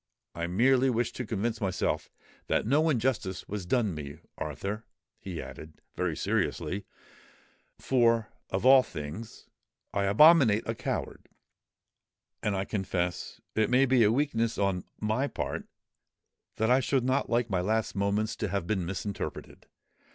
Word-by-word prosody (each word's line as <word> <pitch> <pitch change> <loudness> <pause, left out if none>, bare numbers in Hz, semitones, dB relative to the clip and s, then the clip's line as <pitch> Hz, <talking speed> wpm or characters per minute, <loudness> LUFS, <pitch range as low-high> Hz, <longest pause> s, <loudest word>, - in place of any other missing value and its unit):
I 85 0 -3
merely 125 +8 +3
wished 120 -1 -1
to 125 - -4
convince 110 +2 -2
myself 95 -2 -1 0.4
that - - +1
no 150 +7 +3
injustice 115 -8 -1
was 100 -3 -5
done 110 -2 +1
me, 75 -2 -7 0.2
Arthur," 105 +3 -4 0.4
he 90 -4 -6
added, 80 0 -9 0.2
very - - -1
seriously; 100 +1 -1 0.9
"for, 115 -4 +2 0.2
of 95 +5 -2
all 130 0 +9
things, 80 +3 -8 0.5
I 100 - +1
abominate 115 0 +6
a 115 - 0
coward; - - -4 1.1
and 105 -2 0
I 95 0 -1
confess—it 95 +2 -2
may 130 +2 +5
be 130 -2 +3
a 105 - +4
weakness 115 -4 0
on 95 -3 0
my 110 +6 0
part—that 110 -4 -6
I 130 - +6
should 135 -1 +1
not 130 +2 +1
like 120 -1 +1
my 95 -2 +1
last 110 +4 0
moments 100 +2 0
to 110 - -1
have 100 -2 -2
been 95 -2 -1
misrepresented. 100 +2 -5
110 Hz, 135 wpm, -29 LUFS, 95-125 Hz, 1.1 s, all